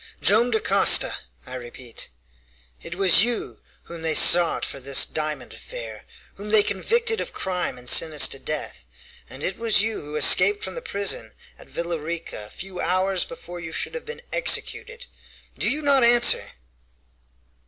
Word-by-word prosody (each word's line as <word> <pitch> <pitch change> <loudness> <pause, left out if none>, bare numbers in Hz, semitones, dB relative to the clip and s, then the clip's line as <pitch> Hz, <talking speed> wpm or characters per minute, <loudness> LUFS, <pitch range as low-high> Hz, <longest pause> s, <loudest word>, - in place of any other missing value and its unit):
"Joam 225 +5 +3
Dacosta, 200 -4 +3 0.3
I - - -11
repeat! 120 -1 -6 0.7
It 175 - -8
was 190 +1 +5
you 240 0 -3 0.2
whom 170 -1 -11
they 160 -1 -2
sought 170 +1 +4
for 140 - -7
this 135 +1 +2
diamond 150 -5 -5
affair, 110 -2 -10 0.3
whom 205 +2 -9
they 215 -1 +4
convicted 450 - 0
of - - -6
crime 180 -8 -4
and 125 0 -15
sentenced 155 +2 +4
to 135 - -4
death, 140 - -6 0.4
and 130 +4 -10
it 190 - -3
was 225 -3 +1
you 225 0 -2
who 150 +1 -9
escaped 195 +7 +5
from 190 - -5
the - - -7
prison 200 - -2 0.3
at - - -17
Villa 170 -1 -4
Rica 160 -8 -6
a - - -19
few 190 - -9
hours 185 0 -1
before 175 +1 -11
you 165 -1 -8
should - - -3
have 485 - -8
been 470 +1 -9
executed! - - 0 0.5
Do - - 0
you 300 +2 -3
not 280 -3 +2
answer?" 240 0 +4
185 Hz, 165 wpm, -22 LUFS, 150-225 Hz, 0.7 s, was